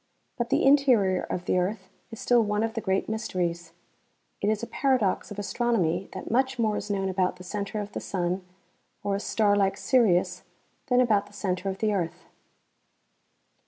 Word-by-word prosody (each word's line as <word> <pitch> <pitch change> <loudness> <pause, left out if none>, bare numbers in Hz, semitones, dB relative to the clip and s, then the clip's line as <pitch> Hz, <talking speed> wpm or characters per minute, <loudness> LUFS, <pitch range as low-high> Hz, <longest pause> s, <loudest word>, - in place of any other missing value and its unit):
But 240 -1 -2
the - - +2
interior 250 -10 +4
of 180 - -4
the 180 - +2
earth 190 +1 -2 0.2
is 225 -2 -9
still 245 -2 +4
one 210 0 0
of 225 0 -1
the 225 - -3
great 190 -2 0
mysteries. 175 -6 -3 0.7
It 205 - +1
is 215 +1 0
a - - 0
paradox 250 -8 0
of 205 - -8
astronomy 195 -4 0
that - - -6
much 260 +2 +1
more 220 -3 +1
is 210 - -4
known 195 -1 0
about 185 -1 0
the 180 - -12
center 200 +2 -4
of 205 0 -5
the - - -4
sun 180 0 -2 0.6
or 200 -1 0
a - - -2
star 205 0 +2
like 195 -1 +2
Sirius 185 -9 +2 0.5
than 250 -2 +4
about 210 -5 +2
the 205 - -19
center 195 -1 -2
of 190 - -4
the 215 +1 +1
earth. 175 -5 -3
205 Hz, 185 wpm, -27 LUFS, 185-225 Hz, 0.7 s, interior